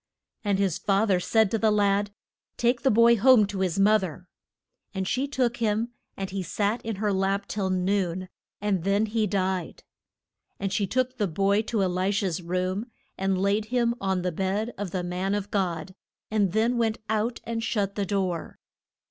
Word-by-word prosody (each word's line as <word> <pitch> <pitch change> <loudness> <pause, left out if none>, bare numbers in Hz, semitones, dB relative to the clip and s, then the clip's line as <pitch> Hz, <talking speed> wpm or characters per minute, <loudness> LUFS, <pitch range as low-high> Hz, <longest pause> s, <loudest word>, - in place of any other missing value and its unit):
And 200 -2 +1
his 195 -4 0
fath 200 +1 +2
er 185 - +3
said 220 +2 +2
to 225 - 0
a 220 - +5
lad, 205 -1 +2 0.5
Take 240 0 +2
the 270 - +3
boy 235 +1 +5
home 245 -1 +6
to 200 -1 -5
his 185 -2 0
moth 210 +2 +5
er. 180 0 -6 0.7
And 190 -1 -2
she 260 +6 0
took 250 -4 0
him, 225 +1 0 0.3
and 195 -1 -4
he 195 0 -2
sat 205 +5 -1
in 225 -1 -3
her 205 +1 0
lap 195 +1 0
till 195 -3 -2
noon, 185 -1 0 0.3
and 195 -4 0
then 200 +3 +2 0.2
died. 185 -3 -2 0.8
And 195 -1 -2
she 200 -2 +1
took 255 +3 -1
the 205 - +2
boy 195 +4 +2
to 215 -4 +1
E - - +3
li 185 +1 0
sha's 195 -4 -1
room, 185 +5 -2 0.3
and 190 0 0
laid 200 +2 +1
him 235 0 +1
on 190 -2 0
the 180 - 0
bed 195 +7 -1
of 205 -1 -4
the 180 0 -3
man 180 +3 -1
of 205 0 -4
God, 185 -3 -1 0.4
and 205 -4 +2
then 230 +4 +1
went 225 -1 +1
out 220 +2 -1
and 230 -1 -3
shut 205 -3 -1
the 205 - -1
door. 185 -4 -2
200 Hz, 190 wpm, -26 LUFS, 190-220 Hz, 0.8 s, home